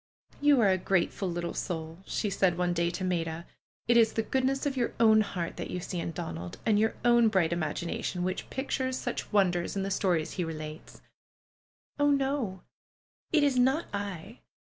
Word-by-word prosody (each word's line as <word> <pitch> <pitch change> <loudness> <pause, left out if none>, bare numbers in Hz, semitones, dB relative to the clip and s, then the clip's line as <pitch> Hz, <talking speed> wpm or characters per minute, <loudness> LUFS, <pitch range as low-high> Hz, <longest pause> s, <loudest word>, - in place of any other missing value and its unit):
^^You 290 -1 +5
are 220 -5 +4
a 185 0 +2
grateful 190 +1 0
little 170 0 -3
soull'^ 160 -1 -4
she 210 - -1
said 180 -2 +2
one 180 0 +1
day 170 0 +1
to 175 +2 -4
Maida. 170 -2 -2 0.4
^Ht 235 - +4
is 225 -1 +5
the 225 - 0
goodness 265 +4 0
of 280 -2 0
your 245 -2 -1
own 220 -1 +6
heart 180 -5 -4
that - - -5
you 180 - -3
see 175 0 -4
in 170 - -3
Donald, 85 - -6
and 215 -2 +3
your 220 +1 +1
own. 240 -1 +6
bright 185 -6 +2
imagination 170 +2 -2
which 185 +1 -3
pictures 260 -1 -2
such 245 - -4
wonders 180 -4 +2
in 195 - -1
the 195 - -3
stories 180 -5 +1
he 180 - -2
relates 155 -1 -7
V* - - -18 1.0
Oh, 290 0 +4
no! 270 -9 0 0.7
It 310 -3 +4
is 275 -3 +3
not 265 +6 +3
I. 200 +2 -5
195 Hz, 190 wpm, -29 LUFS, 170-240 Hz, 1.0 s, own